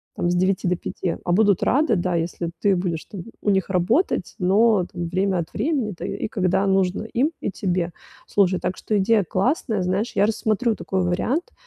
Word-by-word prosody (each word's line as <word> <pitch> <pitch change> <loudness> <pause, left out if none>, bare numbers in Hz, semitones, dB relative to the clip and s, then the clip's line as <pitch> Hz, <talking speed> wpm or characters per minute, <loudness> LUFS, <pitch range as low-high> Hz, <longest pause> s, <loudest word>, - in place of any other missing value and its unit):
там, 175 - 0
с - - +1
9 185 +1 +1
до 180 0 +1
5, 175 0 -4
а 175 - 0
будут 200 -1 +3
рады, 265 -3 +2
да, 180 0 -1
если 170 0 -2
ты 200 -2 +3
будешь 175 -3 -2
там 195 - -8 0.2
у - - 0
них 190 0 +1
работать, 190 - +1
но 200 +1 +3
там 175 -3 -4
время 190 +1 0
от 165 - -5
времени, 270 -9 -1
да, 175 - -6
и - - -3
когда 190 -1 +1
нужно 190 -1 +1
им 250 +7 0
и - - -2
тебе. 180 -3 -1 0.4
Слушай, 190 -2 +2
так 180 +1 -3
что 215 - -1
идея 210 +1 +3
классная, 210 - 0
знаешь, 190 +5 -1
я 200 - +4
рассмотрю 220 +1 0
такой 190 -2 -2
вариант, 250 - -1
190 Hz, 195 wpm, -23 LUFS, 180-215 Hz, 0.4 s, я